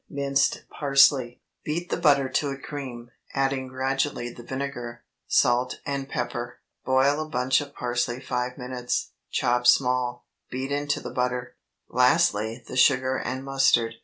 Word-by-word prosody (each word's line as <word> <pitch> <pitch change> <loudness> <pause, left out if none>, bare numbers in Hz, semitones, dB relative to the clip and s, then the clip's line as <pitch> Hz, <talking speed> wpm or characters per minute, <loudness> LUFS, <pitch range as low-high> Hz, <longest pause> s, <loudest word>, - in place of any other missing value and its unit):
Minced 140 -1 0
parsley. 135 -3 +3 0.2
Beat 170 +3 -3
the - - +1
butter 140 -2 +4
to 140 +2 0
a 135 - -4
cream, 130 -4 -7 0.2
adding 135 -1 0
gradually 130 -1 -1
the - - -11
vinegar, 120 -2 -5 0.2
salt, 125 0 +2
and 140 -1 -3
pepper. 120 0 -4 0.3
Boil 135 +3 +3
a 155 - -5
bunch 125 -1 +2
of 145 -1 -9
parsley 120 0 -1
five 125 -1 -3
minutes, 125 -1 -3 0.2
chop 125 0 +1
small; 125 -2 +2 0.2
beat 130 +2 -4
into 145 0 -1
the - - -6
butter; 125 -1 -2 0.3
lastly 125 -4 +2
the - - -7
sugar 130 0 +4
and 130 0 -3
mustard. 135 -4 +2
130 Hz, 140 wpm, -26 LUFS, 125-140 Hz, 0.3 s, butter